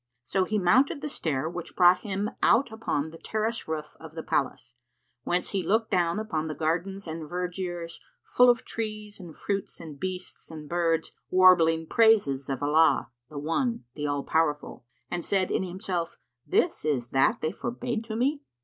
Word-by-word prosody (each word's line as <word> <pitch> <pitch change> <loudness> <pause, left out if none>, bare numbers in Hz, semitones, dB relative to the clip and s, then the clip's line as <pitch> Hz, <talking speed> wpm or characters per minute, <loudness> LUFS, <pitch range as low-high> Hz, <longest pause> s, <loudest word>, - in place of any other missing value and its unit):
So 185 +9 0
he 215 +3 -1
mounted 260 - +3
the 305 - -3
stair, 155 - -2
which 175 0 -7
brought 180 0 +6
him 205 +2 -3
out 240 0 +4
upon 160 -9 -2
the 165 - -12
terrace 220 +1 -2
roof 155 -1 -4
of 160 0 -11
the 160 - -5
palace, 120 -2 -2 0.5
whence 180 +1 0
he 195 - -1
looked 220 +4 +1
down 175 0 +2
upon 165 -8 -2
the 155 - -4
gardens 180 +5 -2
and 160 -2 -6
vergiers, 175 -1 -4 0.2
full 250 0 +5
of 240 -1 +2
trees 215 -2 -5
and 175 -4 -11
fruits 200 -1 -3
and 155 -4 -9
beasts 185 -1 -5
and 155 -2 -9
birds 165 -1 0 0.2
warbling 170 -3 +5
praises 180 - +3
of 135 0 -2
Allah, 155 +1 +3 0.2
the 150 - -9
One, 165 - -1
the 150 +1 -3
All 145 -1 -1
powerful; 150 -5 -1 0.3
and 175 -1 -2
said 190 -2 0
in - - +1
himself 180 -2 -3 0.3
"This - - +1
is 135 -6 -1
that 135 0 +2
they 155 - 0
forbade 240 -1 -3
to 220 -1 -5
me." 280 +5 0
175 Hz, 175 wpm, -27 LUFS, 160-210 Hz, 0.5 s, brought